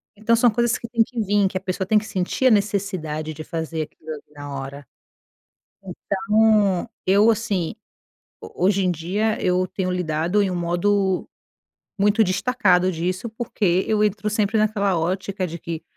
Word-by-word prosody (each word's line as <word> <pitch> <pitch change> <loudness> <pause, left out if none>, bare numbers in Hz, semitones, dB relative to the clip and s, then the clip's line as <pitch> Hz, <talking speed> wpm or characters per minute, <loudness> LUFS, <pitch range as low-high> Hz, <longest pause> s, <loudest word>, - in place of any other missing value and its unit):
Então, 220 +3 +2
são 235 +1 +4
coisas 240 +1 +1
que 235 - -7
têm 230 -1 +2
que 240 +1 -7
vim, 205 -1 +2
que 185 - -3
a - - -5
pessoa 190 0 -3
tem 215 - +4
que 215 - -10
sentir 200 +5 0
a - - +5
necessidade 185 -7 -1
de 155 - -7
fazer 160 -1 -3
aquilo 155 +1 -14
ali 150 - -7
na 145 -1 -8
hora. 140 +1 -8 1.2
Então 205 -1 +2 0.2
eu, 200 +4 +5
assim, 205 -6 -1 0.7
ho - - -10
hoje 195 0 +3
em 180 - +2
dia 195 +7 -1
eu 185 0 +2
tenho 185 0 -3
lidado 175 +2 0
em 195 - +1
um - - -2
modo 185 +2 0 0.7
muito 210 +2 +4
destacado 185 -2 +2
disso, 180 +6 -3
porque 205 -5 0
eu 215 -1 +2
entro 210 0 -1
sempre 210 +1 0
naquela 200 -4 +1
ótica 185 +2 -2
de 170 +1 -7
que: 165 -1 -6
190 Hz, 170 wpm, -22 LUFS, 175-210 Hz, 1.2 s, a